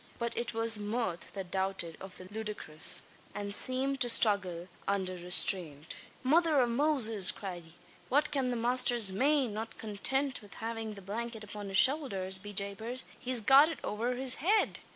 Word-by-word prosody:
But 235 -1 -5
it 235 -1 -5
was 225 -1 +3
mirth 205 -4 -5
that 190 -3 -8
doubted 190 -4 -4
of 190 -1 -10
the 185 - -12
ludicrous; 210 -8 +2 0.3
and 205 -1 -1
seemed 265 +4 +1
to 245 - +2
struggle 195 -7 +2 0.2
under 190 -2 -2
restraint. 175 -4 +2 0.3
"Mother 315 +2 +2
av 245 -2 +1
Moses!" 235 -7 +3
cried 180 -4 -6
he. 165 - -18 0.4
"What 300 +3 0
can 270 -3 -2
the 245 - -3
masther 245 +1 +2 0.2
mane? 265 +1 0
Not 225 +2 -7
contint 265 +6 -3
with 205 - -14
havin' 225 -1 -6
the 200 - -13
blankyet 225 +3 -6
upon 210 -1 -9
his 195 - -2
showldhers, 195 -9 +2
be 205 0 -9
japers, 205 +6 -2 0.2
he's 250 -2 +1
got 270 +7 +5
it 325 - -6
over 235 +4 -3
his 260 0 +3
head! 410 +7 0
220 Hz, 170 wpm, -30 LUFS, 195-255 Hz, 0.4 s, got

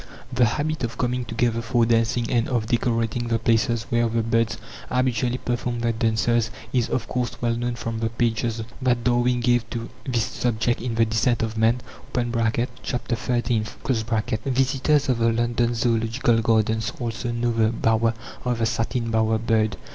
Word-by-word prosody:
The 125 -1 +4
habit 150 +5 -1
of 115 0 -3
coming 125 0 -1
together 115 0 0
for 115 0 +2
dancing 115 +1 +1
and 120 -1 +2
of 120 -4 0
decorating 115 0 0
the 115 -1 +1
places 115 0 +1
where 120 -1 +2
the 115 0 0
birds 115 0 +1 0.3
habitually 125 -1 +1
perform 120 -1 -2
their 115 0 +1
dances 115 0 +1 0.2
is, 125 -3 +1
of 120 - -1
course, 125 -1 -2
well 120 -1 +1
known 120 +1 -2
from 115 -1 -4
the 115 0 0
pages 115 0 -1 0.2
that 125 -2 +1
Darwin 120 0 +2
gave 120 -1 +2
to 115 -1 -5 0.2
this 120 -4 +1
subject 120 +1 -1
in 120 -2 -3
The 115 0 +4
Descent 115 +1 +1
of 115 0 -3
Man 115 +2 +2 0.3
(ch. - - -1 0.7
xiii). 120 -1 -1 0.8
Visitors 135 +2 +2
of 125 -3 +1
the 115 0 +3
London 120 +1 +1
Zoological 115 0 +1
Gardens 110 0 +1
also 120 0 -3
know 120 0 0
the 115 -1 +2
bower 115 0 +1 0.3
of 125 -1 0
the 115 - +1
satin 115 +1 -1
bower 110 0 +2
bird. 110 -2 +1
115 Hz, 165 wpm, -24 LUFS, 115-120 Hz, 0.8 s, The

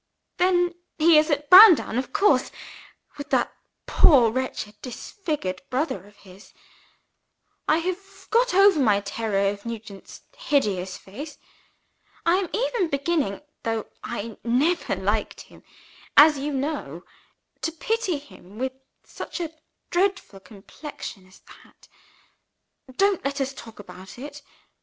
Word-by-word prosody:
then 355 -1 +2 0.2
he 320 0 +6
is 305 +2 0
at 295 -1 -1
Browndown 365 - +8
of 260 - -5
course 415 0 +3 0.7
with 285 - -7
that - - +1 0.3
poor 250 -8 +5
wretched 255 -4 -4
disfigured 250 - -5
brother 255 - -2
of 205 - -20
his. 195 0 -17 1.1
I 310 - +4
have 370 0 -1 0.3
got - - +3
over 390 -4 +6
my 210 -6 +3
terror 200 -1 -1
of 200 0 -9
Nugent's 220 -4 -9
hideous 195 -10 -1
face. 280 +11 -10 0.9
I 340 +2 +4
am 380 -2 -2
even 465 -5 0
beginning 280 - -1 0.2
(though 225 -1 -2 0.2
I 230 -1 -6
never 275 - +1
liked 205 +3 -2
him, - - -17 0.6
as 300 -1 +8
you 290 +2 -3
know) 270 - -4 0.6
to 325 - -1
pity 380 +1 -1
him, 215 -8 -15
with 260 +2 -2 0.3
such - - -8
a 330 -3 -4 0.4
dreadful 375 - -1
complexion 200 0 -10
as 185 - -20
that. - - -19 1.1
Don't 395 -1 +2
let 275 0 -2
us 270 0 -2
talk 230 -4 -12
about 190 -1 -12
it! 290 +3 -9
275 Hz, 130 wpm, -24 LUFS, 210-335 Hz, 1.1 s, Browndown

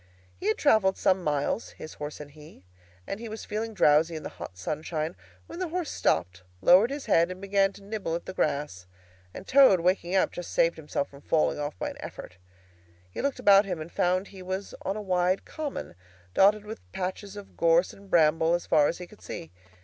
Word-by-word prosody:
He 90 - -5
had 215 - +2
travelled 215 -9 +3
some 185 -1 +2
miles, 150 +8 -1
his 155 - -9
horse 150 0 -7
and 145 -1 -9
he, 150 - -15 0.4
and 195 - -5
he 230 -1 -7
was 220 +1 -7
feeling 220 +1 -4
drowsy 160 -1 +4
in 155 - -6
the - - -5
hot 90 - -10
sunshine, 155 - -3 0.3
when 335 - -9
the 370 - -1
horse 345 -2 -3
stopped, 90 +2 0 0.2
lowered 185 - +6
his 280 0 -5
head, 170 -5 +3
and 185 0 -7
began 195 0 +2
to 200 - -14
nibble 200 -5 -3
the 185 - -9
grass; 140 - -2 0.4
and 190 - -10
Toad, 260 -10 +6
waking 180 +1 +1
up, 190 - +3
just 175 - -7
saved 170 0 +3
himself 150 -2 -3
from 140 0 -15
falling 155 0 +1
off 145 -9 -4
by - - -3
an - - -12
effort. 90 - -9 0.7
He - - -4
looked 280 -1 -1
about 205 -4 +6
him 180 -4 -3
and 155 +2 -7
found 185 +2 0
he 190 -2 -11
was 190 +2 -5
on 195 +2 -3
a - - -4
wide 185 0 +1
common, 300 - -5 0.4
dotted 205 +2 +4
with 220 +1 -8
patches 190 +2 -4
of 205 -1 -11
gorse 170 +2 +3
and 200 0 -16
bramble 165 0 +4
as 175 - -4
far 150 -2 +4
as 170 - -2
he 180 - -7
could 210 +4 -18
see. 80 - -8
180 Hz, 210 wpm, -27 LUFS, 155-200 Hz, 0.7 s, lowered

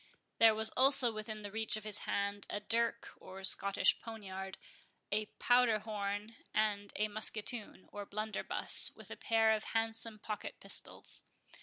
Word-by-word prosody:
There 225 -1 +7
was 220 0 +1
also 265 -2 +5
within 215 0 -6
the 205 - -6
reach 220 0 +3
of 215 - -8
his 210 -1 -1
hand 200 0 -1
a 205 - -2
dirk, 230 +2 0
or 190 +1 -11
Scottish 200 +1 +3
poniard, 190 -4 -7 0.5
a 210 +1 0
powder 245 -2 +4
horn, 210 +1 -4 0.2
and 205 -2 0
a 215 - +1
musketoon, 215 0 +1
or 205 -1 -7
blunderbuss, 215 +1 +1
with - - -12
a - - -5
pair 225 -1 +2
of 215 0 0
handsome 225 0 -1
pocket 215 0 -6
pistols. - - -3
215 Hz, 150 wpm, -34 LUFS, 205-225 Hz, 0.5 s, There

